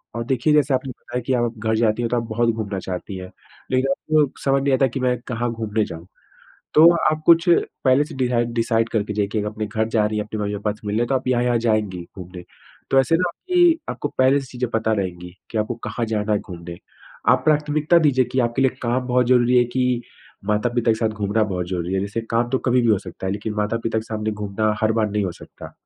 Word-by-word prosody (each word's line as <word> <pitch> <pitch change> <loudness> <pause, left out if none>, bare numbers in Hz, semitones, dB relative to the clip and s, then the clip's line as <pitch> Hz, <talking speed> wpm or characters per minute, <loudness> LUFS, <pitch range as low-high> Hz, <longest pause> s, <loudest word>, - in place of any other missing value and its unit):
और 115 - -2
देखिए, 130 +4 +1
जैसे 145 -2 +3
आपने 130 +1 -1
बताया 125 0 -6
कि 130 - +2
आप 120 -2 0
घर 110 0 0
जाती 110 0 +1
हैं 115 - -1
तो 120 - 0
आप 115 - -1
बहुत 115 +1 +1
घूमना 105 -3 -2
चाहती 95 +2 -6
हैं। 90 0 -8 0.4
लेकिन 130 +1 +2
आपको, 150 0 +1 0.2
समझ 135 0 +3
नहीं 140 -1 +2
आता, 130 +1 +3
कि 130 +2 -5
मैं, 125 -1 +1
कहाँ 120 -1 -2
घूमने 110 -1 -1
जाऊँ। 85 +2 -9 0.7
तो, 160 +2 +8 0.2
आप 155 0 -3
कुछ, 170 +1 +5 0.4
पहले 130 +2 +4
से 155 - -10
दिराइड 120 -2 0
डिसाइड 115 -1 +1
करके 105 -1 -1
जाइए 100 -1 0
कि 110 - 0
अपने 110 0 -4
घर 110 +1 -1
जा 110 -2 +2
रही 105 0 -2
हैं, 105 - -1
अपने 110 0 -6
मम्मी-पापा 105 0 -2
से 105 0 -14
मिलने 110 +4 0
तो 135 - 0
आप 130 - -4
यहाँ-यहाँ 120 -1 +2
जाएँगी 110 -6 0 0.2
घूमने। 90 -1 -9 0.5
तो 135 - +6
ऐसे 165 +5 +2
ना 180 +1 +1
आपकी 350 - +2
आपको 145 - -3
पहले 130 +2 +4
से 135 - -9
चीज़ें 125 -1 -3
पता 110 -1 0
रहेंगी, 90 -3 -3 0.2
कि 110 - -2
आपको 110 +3 -1
कहाँ 120 - -2
जाना 110 -1 -1
है 105 - +3
घूमने। 85 -2 -9 0.5
आप 130 0 +3
प्राथमिकता 150 +2 +3
दीजिए 135 -5 +3
कि 130 - +2
आपके 120 +2 0
लिए 130 - +4
काम 125 +1 0
बहुत 125 0 +2
ज़रूरी 125 0 +4
है 120 - +4
कि, 125 0 0 0.4
माता-पिता 115 +3 +1
के - - -2
साथ 110 - +1
घूमना 105 +1 0
बहुत 90 -4 -3
ज़रूरी 90 -1 -3
है। 95 - +1
जैसे 100 +3 -3
काम 120 +1 +1
तो 130 - +1
कभी 125 0 +4
भी 120 - +2
हो 105 -3 +4
सकता 95 -1 -8
है, 95 - 0
लेकिन 105 +1 -4
माता-पिता 110 +2 -1
के - - -3
सामने 110 -1 -3
घूमना 105 +1 -1
हर 110 0 +3
बार 110 -2 0
नहीं 105 -1 0
हो 90 - -3
सकता। - - -12
115 Hz, 235 wpm, -22 LUFS, 105-130 Hz, 0.7 s, तो